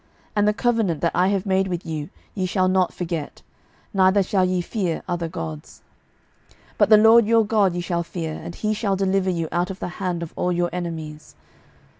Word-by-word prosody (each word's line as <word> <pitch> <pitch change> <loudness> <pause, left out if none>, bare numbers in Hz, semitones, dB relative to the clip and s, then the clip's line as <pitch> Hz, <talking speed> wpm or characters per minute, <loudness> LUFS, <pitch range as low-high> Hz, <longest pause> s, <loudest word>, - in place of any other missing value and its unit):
12:017:038 - - -38
And 205 0 +3
the 210 - +3
covenant 225 - 0
that 170 - +1
I 180 +2 +3
have 195 0 0
made 190 -1 +1
with 175 -1 -4
you 155 -1 -4 0.2
ye 185 -3 -2
shall 185 0 +1
not 185 -1 +2
forget; 165 -4 -5 0.5
neither 195 +1 +4
shall 190 0 +1
ye 185 0 +1
fear 175 -2 -2
other 175 -1 -2
gods. 80 - -7 0.7
12:017:039 - - -27 0.2
But - - +4
the 215 - +8
LORD 225 +1 +6
your 225 -1 +4
God 205 -4 +2
ye 175 - -2
shall 175 0 -1
fear; 165 -2 -5
and 170 - -8
he 215 0 -1
shall 205 -2 0
deliver 190 0 +1
you 165 -3 -1
out 175 +1 0
of 190 - -6
the - - -4
hand 180 -3 -1
of 165 - -8
all 180 - 0
your 175 0 0
enemies. 160 -4 -6
185 Hz, 210 wpm, -23 LUFS, 170-195 Hz, 0.7 s, the